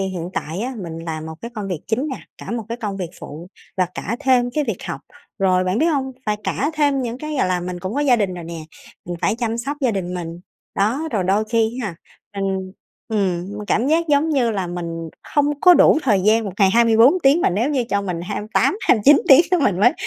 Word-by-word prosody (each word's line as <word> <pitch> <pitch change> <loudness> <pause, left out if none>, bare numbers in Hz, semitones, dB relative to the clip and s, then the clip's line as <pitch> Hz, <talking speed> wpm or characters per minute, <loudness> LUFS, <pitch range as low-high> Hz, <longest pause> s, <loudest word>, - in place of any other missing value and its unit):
hiện 185 -2 -3
tại 165 +6 -4
á 255 +2 -3
mình 165 -5 -6
làm 160 -1 -5
một 160 - -7
cái 235 - -7
công 205 -2 -5
việc 175 -5 -3
chính 255 +7 -1
nè, 265 - -4 0.2
cả - - -8
một 230 -2 -3
cái 235 - -4
công 205 -4 -4
việc 180 -4 -5
phụ 160 +5 -9 0.3
và 185 -1 +2
cả 230 +4 -3
thêm 250 -3 +3
cái 300 +2 -1
việc 220 -7 -4
học. 135 - -5 0.4
Rồi 185 -1 +2
bạn 185 +4 0
biết 320 - +3
hông? 270 -5 0
Phải 210 0 +1
cả 290 +4 -1
thêm 285 -3 +1
những 240 +1 -4
cái 305 +1 -5
gọi - - +2
là 180 -1 0
mình 180 0 -5
cũng 190 +4 -4
có 290 - 0
gia 260 -4 +4
đình 195 -4 -1
rồi 175 - -7
nè, 165 0 -7 0.5
mình 175 0 -4
phải - - +1
chăm 230 -1 -2
sóc 275 +5 -3
gia 255 - +2
đình 185 -3 -3
mình. 170 -1 -6 0.3
Đó, 245 +11 0
rồi 195 -4 0
đôi 200 +4 +2
khi 225 +2 0
á 210 - -2
ha, 170 - -9 0.4
mình 190 -1 -2 0.4
ừm, 195 -2 -1
m 210 - -6
cảm 235 +5 +1
giác 330 +2 +2
giống 295 +2 +3
như 250 -6 +2
là 195 -4 -2
mình 170 -1 -5 0.3
hông 290 0 +2
có 360 +1 +8
đủ 315 - +6
thời 210 -7 +2
gian, 220 +3 +3
một 195 - -4
ngày 195 -2 +5
24 230 - +5
tiếng 275 +5 +5
mà - - +2
nếu 225 +11 0
như 260 -5 0
cho 200 0 +1
mình 180 -3 -3
28-29 240 - +2
tiếng 275 +4 +9 0.2
mình 185 -1 +1
mới 245 +4 +5
215 Hz, 240 wpm, -20 LUFS, 185-260 Hz, 0.5 s, tiếng